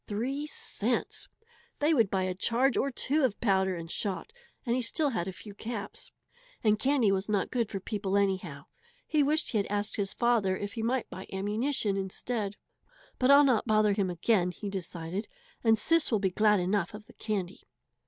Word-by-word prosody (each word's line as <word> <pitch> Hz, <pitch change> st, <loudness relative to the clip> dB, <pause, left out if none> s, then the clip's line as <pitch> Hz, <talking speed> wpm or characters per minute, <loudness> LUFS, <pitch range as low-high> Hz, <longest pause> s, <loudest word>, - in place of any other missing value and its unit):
Three 265 Hz, +8 st, -2 dB
cents! -, -, -2 dB, 0.5 s
They 300 Hz, +2 st, +2 dB
would 230 Hz, -9 st, +3 dB
buy 190 Hz, -1 st, 0 dB
a 185 Hz, 0 st, -1 dB
charge 235 Hz, +7 st, +2 dB
or 275 Hz, -, +1 dB
two 280 Hz, +3 st, +1 dB
of 245 Hz, -6 st, +1 dB
powder 190 Hz, -4 st, +2 dB
and 165 Hz, -1 st, -7 dB
shot, 205 Hz, -, -3 dB, 0.3 s
and 240 Hz, -1 st, +1 dB
he 255 Hz, -, 0 dB
still 280 Hz, +5 st, 0 dB
had 185 Hz, -7 st, -2 dB
a -, -, -2 dB
few 205 Hz, +2 st, -11 dB
caps. 220 Hz, 0 st, -6 dB, 0.5 s
And 215 Hz, -2 st, +3 dB
candy 260 Hz, -6 st, +3 dB
was 195 Hz, +2 st, -1 dB
not 200 Hz, -3 st, 0 dB
good 235 Hz, -4 st, 0 dB
for 195 Hz, -, -4 dB
people 200 Hz, 0 st, -2 dB
anyhow! 185 Hz, -8 st, -1 dB, 0.4 s
He 305 Hz, -, +2 dB
wished 300 Hz, +3 st, +2 dB
he 220 Hz, -, +1 dB
had 200 Hz, -, -1 dB
asked 205 Hz, +1 st, -2 dB
his 195 Hz, -2 st, -1 dB
father 225 Hz, -6 st, +2 dB
if 205 Hz, 0 st, -5 dB
he 230 Hz, -, -4 dB
might 240 Hz, +2 st, 0 dB
buy 190 Hz, -, -8 dB
ammunition 210 Hz, +2 st, 0 dB
instead. 200 Hz, +2 st, -3 dB, 0.6 s
"But 255 Hz, -, +3 dB
I'll 280 Hz, +1 st, +8 dB
not 250 Hz, -5 st, +2 dB
bother 215 Hz, -2 st, +4 dB
him 195 Hz, -2 st, 0 dB
again," 180 Hz, +1 st, +2 dB
he 200 Hz, +2 st, -6 dB
decided, 180 Hz, +1 st, -4 dB, 0.4 s
"and 225 Hz, -1 st, +5 dB
Sis 330 Hz, +8 st, +2 dB
will 220 Hz, -, +4 dB
be 190 Hz, -2 st, 0 dB
glad 210 Hz, +1 st, +4 dB
enough 185 Hz, +1 st, 0 dB
of 210 Hz, 0 st, -10 dB
the -, -, -17 dB
candy." 200 Hz, -4 st, -4 dB
210 Hz, 195 wpm, -29 LUFS, 190-240 Hz, 0.6 s, I'll